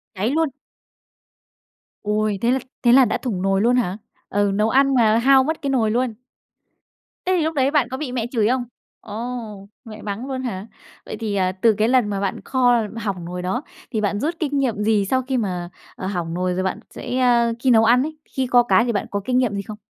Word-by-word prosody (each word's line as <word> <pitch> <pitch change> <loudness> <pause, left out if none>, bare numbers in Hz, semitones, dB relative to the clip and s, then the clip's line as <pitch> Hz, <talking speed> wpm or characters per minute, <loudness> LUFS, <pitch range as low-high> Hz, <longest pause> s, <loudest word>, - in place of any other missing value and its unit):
Cháy 210 +6 0
luôn. 320 0 +1 1.5
Ôi, 210 -1 0
thế 235 - +2
là 265 - +2 0.2
thế 240 - +5
là 260 0 +7
đã - - 0
thủng 210 -8 -3
nồi 195 0 +1
luôn 240 +2 +3
hả? 200 -6 0 0.3
Ừ, 205 0 +1
nấu 210 +2 +1
ăn 275 +2 +3
mà 225 -2 +4
hao 265 +2 +5
mất 315 +3 -2
cái 280 - -2
nồi 230 -5 +2
luôn? 245 -1 0 1.1
Thế 370 - +2
thì 320 - +1
lúc 320 0 -1
đấy 270 0 +2
bạn 285 -6 +2
có 260 - -4
bị 270 -3 -4
mẹ 240 -2 -2
chửi 220 -4 +2
không? 255 +1 +1 0.4
Ồ, 220 -2 -6 0.2
mẹ 215 -1 -10
mắng 210 +5 -5
luôn 260 -1 -3
hả? 205 -3 -4 0.4
Vậy - - -6
thì, 215 -3 -2
à, 185 -1 +1
từ 205 +4 +3
cái 215 +1 +2
lần 250 -3 +3
mà 200 -1 -2
bạn 195 -1 -2
kho 245 -3 +3 0.2
hỏng 200 -6 -4
nồi 180 +1 -5
đó 235 +10 -2 0.3
thì 220 - -1
bạn 205 0 0
rút 325 +8 -1
kinh 290 -3 -1
nghiệm 230 -6 0
gì 210 -2 +2
sau 260 +5 +1
khi 260 0 -2
mà, 180 -5 -2 0.3
à, 185 - -5
hỏng 175 -4 -3
nồi 180 +1 -1
rồi 185 +1 -1
bạn 190 +3 -2
sẽ 255 - -5
a, 240 -2 +3
khi 260 - +1
nấu 225 -2 +6
ăn 245 +3 +5
ấy, 310 +1 -5
khi 265 -1 -3
kho 245 0 +5
cá 235 -1 +4
thì 240 - 0
bạn 205 - -1
có 200 - -2
kinh 250 0 +1
nghiệm 250 -5 +1
gì 200 - -2
không? 210 +1 -9
230 Hz, 235 wpm, -21 LUFS, 205-255 Hz, 1.5 s, là